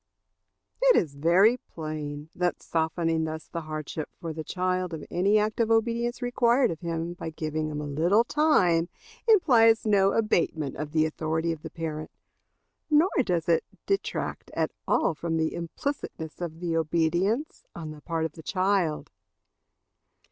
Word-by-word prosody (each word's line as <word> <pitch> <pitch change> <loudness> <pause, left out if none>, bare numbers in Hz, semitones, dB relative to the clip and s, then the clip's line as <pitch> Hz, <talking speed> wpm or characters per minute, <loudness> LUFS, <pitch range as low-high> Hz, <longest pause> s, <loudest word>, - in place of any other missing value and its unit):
It - - +6
is 155 -5 +1
very 175 - +4
plain 155 -5 -6
that 180 0 -1
softening 165 0 0
thus 160 0 -5
the 170 - -5
hardship 155 0 -5
for 165 -3 -5
the 160 0 -5
child 185 0 -1
of 155 - -8
any 195 +4 +3
act 215 +1 0
of 230 -1 +2
obedience 235 +2 +1
required 245 0 +3
of 165 - -5
him 170 0 -3
by 175 - -6
giving 155 -1 -3
him 150 -1 -4
a 150 - -4
little 170 +10 +3
time 185 - +3 0.4
implies 235 - +5
no 200 -2 +4
abatement 165 - 0
of 150 -1 -5
the 155 0 +3
authority 160 +1 -1
of 160 -2 -5
the 160 - -7
parent, 155 -1 -5 0.8
nor 310 +5 +4
does 175 -6 -1
it 165 -1 +3 0.2
detract 395 0 -2
at - - 0 0.2
all - - +2
from 165 +1 -2
the 160 0 +1
implicitness 170 - -5
of 165 -1 -5
the 170 -2 -1
obedience 170 - 0
on 160 -2 -6
the 150 -1 -11
part 165 0 -2
of 160 - -3
the 160 - -12
child. 185 -3 0
170 Hz, 155 wpm, -27 LUFS, 160-210 Hz, 0.8 s, It